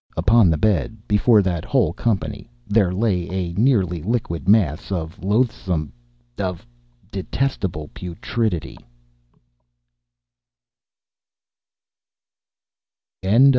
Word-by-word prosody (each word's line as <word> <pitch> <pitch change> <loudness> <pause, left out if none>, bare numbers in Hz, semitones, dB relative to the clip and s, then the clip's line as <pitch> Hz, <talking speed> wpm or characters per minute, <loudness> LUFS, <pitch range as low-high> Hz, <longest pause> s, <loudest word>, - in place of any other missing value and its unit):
Upon 110 -4 +5
the 80 - +2
bed, 105 +4 +1
before 105 +1 +4
that 85 -4 -1
whole 80 - +1
company, 110 +2 -2 0.2
there 100 -3 +3
lay 95 -3 0
a 90 -2 -3
nearly 95 - +2
liquid 95 -3 -2
mass 95 -6 +2
of 80 -3 -4
loathsome—of 105 - -2 0.5
detestable 95 - -2
putrescence. 90 - -3
95 Hz, 75 wpm, -21 LUFS, 85-115 Hz, 0.5 s, Upon